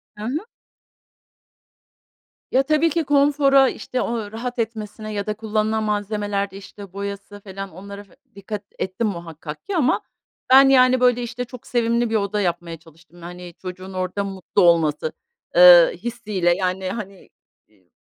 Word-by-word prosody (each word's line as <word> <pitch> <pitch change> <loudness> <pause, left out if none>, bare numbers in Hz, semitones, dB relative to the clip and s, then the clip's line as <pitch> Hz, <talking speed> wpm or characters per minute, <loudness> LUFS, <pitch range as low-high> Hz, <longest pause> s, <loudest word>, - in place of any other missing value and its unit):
Hı 210 - -9
hı. 295 - -3 2.1
Ya, 265 - +3
tabii 305 +3 +2
ki 330 +1 0
konfora, 280 -1 +4
işte, 255 - -4
o 225 -3 -3
rahat 245 +2 -5
etmesine 215 -1 -4
ya 200 -1 -3
da 210 - 0
kullanılan 220 0 -1
malzemelerde, 205 -1 -2
işte, 195 0 -12
boyası 200 +1 -7
felan, 195 0 -7
onlara 200 +3 -10
fe 195 - -24 0.2
dikkat 200 +1 -6 0.2
ettim 190 +4 -2
muhakkak 165 -5 -7
ki 400 - -2
ama, 275 -6 +2 0.5
ben, 270 +1 +8
yani, 255 -1 +5
böyle, 245 -1 +3
işte, 245 +1 -5
çok 250 0 -12
sevimli 235 -1 +1
bir 225 - -1
oda 205 0 0
yapmaya 170 -2 -2
çalıştım. 165 +1 -20
Hani, 175 0 -9
çocuğun 185 +1 -8
orada 185 +2 -2
mutlu 195 -2 -2
olması, 160 -3 +3 0.4
eee, 175 -1 +9
hissi 235 -3 -6
ile. 175 -2 +3
Yani, 185 0 -2
hani, 195 -2 -8 0.4
iii, 95 -4 -32
205 Hz, 150 wpm, -22 LUFS, 185-235 Hz, 2.1 s, eee